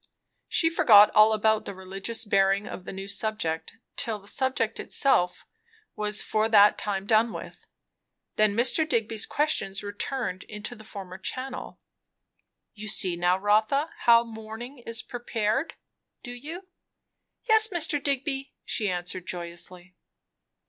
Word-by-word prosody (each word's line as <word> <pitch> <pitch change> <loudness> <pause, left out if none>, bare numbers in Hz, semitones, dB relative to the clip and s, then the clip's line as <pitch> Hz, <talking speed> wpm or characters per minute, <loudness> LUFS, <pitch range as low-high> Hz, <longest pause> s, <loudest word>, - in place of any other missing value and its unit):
She 325 - +1
forgot 225 -11 +7
all 215 +1 +6
about 220 0 +2
the 200 - -6
religious 195 +5 -4
bearing 195 0 +2
of 185 - -8
the - - -6
new 195 0 -7
subject 200 -6 -2 0.2
till 230 -5 -1
the 200 -1 -17
subject 260 -3 -1
itself 180 -10 +1 0.5
was 210 0 0
for 215 +1 0
that 205 -2 +7
time 195 -2 -2
done 220 +2 +3
with. - - -9 0.7
Then 215 -1 +3
Mr. 285 +7 +3
Digby's 225 -3 0
questions 210 -11 -1
returned 205 -1 -3
into 210 +2 -7
the 215 -2 -13
former 190 -4 -9
channel. 260 +5 -5 0.9
"You 215 0 -9
see 185 -3 0
now, 175 +1 +2
Rotha, 215 +10 +2
how 235 0 +7
the 230 - -12
morning 220 +4 -9
is 230 0 -3
'prepared,' 240 +3 -2 0.5
do 245 - -7
you?" 310 +10 -8 0.8
"Yes, 440 -1 +6
Mr. 320 -7 +1
Digby," 275 -1 -2
she 210 -2 -1
answered 180 0 -4
joyously. 175 +1 -6
215 Hz, 135 wpm, -27 LUFS, 195-250 Hz, 0.9 s, forgot